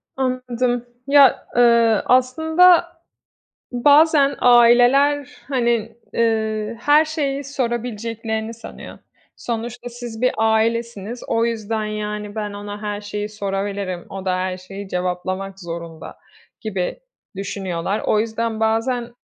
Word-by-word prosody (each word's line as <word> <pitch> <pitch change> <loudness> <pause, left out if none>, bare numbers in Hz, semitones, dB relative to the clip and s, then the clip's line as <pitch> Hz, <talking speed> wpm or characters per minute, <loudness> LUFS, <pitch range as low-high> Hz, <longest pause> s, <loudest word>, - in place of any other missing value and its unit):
Anladım. 250 -2 -1 0.2
Ya, 280 -3 +5
eee, 235 -2 +4
aslında 320 +8 +4 0.9
bazen 285 +2 +4
aileler, 245 +4 +5 0.2
hani, 235 -4 0 0.2
eee, 220 -1 0
her 295 +3 +5
şeyi 285 -3 -2
sorabileceklerini 230 -3 -3
sanıyor. 230 - -11 0.4
Sonuçta 240 +1 -5
siz 240 -2 -8
bir 255 - +3
ailesiniz, 225 0 0
o 230 0 +1
yüzden 220 -1 -2
yani 210 0 -4
"Ben 210 -1 -4
ona 205 +1 -7
her 205 -1 -3
şeyi 210 0 -5
sorabilirim, 195 -3 -4
o 195 -1 -7
da 185 -1 0
her 185 0 -2
şeyi 195 +2 -9
cevaplamak 185 +2 -3
zorunda." 170 -1 -8 0.4
gibi 195 - -3 0.4
düşünüyorlar. 195 0 -3
O 210 - +3
yüzden 225 0 -2
bazen 235 +2 0
225 Hz, 110 wpm, -21 LUFS, 205-245 Hz, 0.9 s, Ya